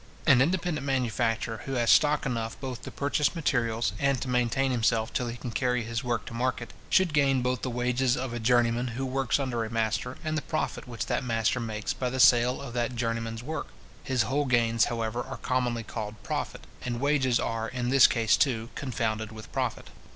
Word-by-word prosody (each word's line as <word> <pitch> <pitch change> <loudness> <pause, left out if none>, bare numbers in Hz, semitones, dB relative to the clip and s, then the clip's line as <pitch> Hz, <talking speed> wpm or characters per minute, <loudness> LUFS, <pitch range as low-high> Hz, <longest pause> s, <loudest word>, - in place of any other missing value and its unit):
An 135 -5 +6
independent 170 0 0
manufacturer, 120 -4 -1
who 135 - -4
has 120 -3 +3
stock 150 -1 +4
enough 115 -3 -3
both 130 -3 -5
to - - -7
purchase 145 +3 0
materials, 115 - 0
and 140 -2 +2
to 130 - -4
maintain 125 +2 +1
himself 115 -2 +1
till 125 - -1
he 120 +1 -5
can 120 - -6
carry 125 0 0
his 115 +1 -3
work 120 -4 -1
to 120 - -8
market, 120 0 -2 0.2
should 185 -4 +3
gain 135 -3 +3
both 125 0 0
the 130 - -2
wages 125 +1 +1
of 125 -1 -3
a 120 - -3
journeyman 120 +1 +2
who 135 - -1
works 130 0 0
under 125 -4 -1
a 110 - -5
master, 115 +3 -1
and 155 -1 -1
the 155 - 0
profit 155 -4 -3
which 120 -2 -4
that - - -1
master 115 0 +1
makes 110 -3 -3
by 125 - -2
the 130 +1 -4
sale 120 +3 +5
of 130 -4 -7
that 120 0 -1
journeyman's 115 -1 -2
work. 155 +2 -4 0.4
His 130 -2 +1
whole 145 +2 0
gains, 115 -3 +3
however, 115 0 -2
are 135 +1 -7
commonly 125 -2 -1
called 110 -1 -5
profit, - - -4 0.2
and 120 -1 -3
wages 135 -3 +2
are, 115 0 -2
in 125 -1 -2
this 135 0 +7
case, 115 -7 +3
too, 115 -4 +1
confounded 110 -5 -2
with 110 0 -11
profit. - - -3
125 Hz, 200 wpm, -28 LUFS, 115-135 Hz, 0.4 s, this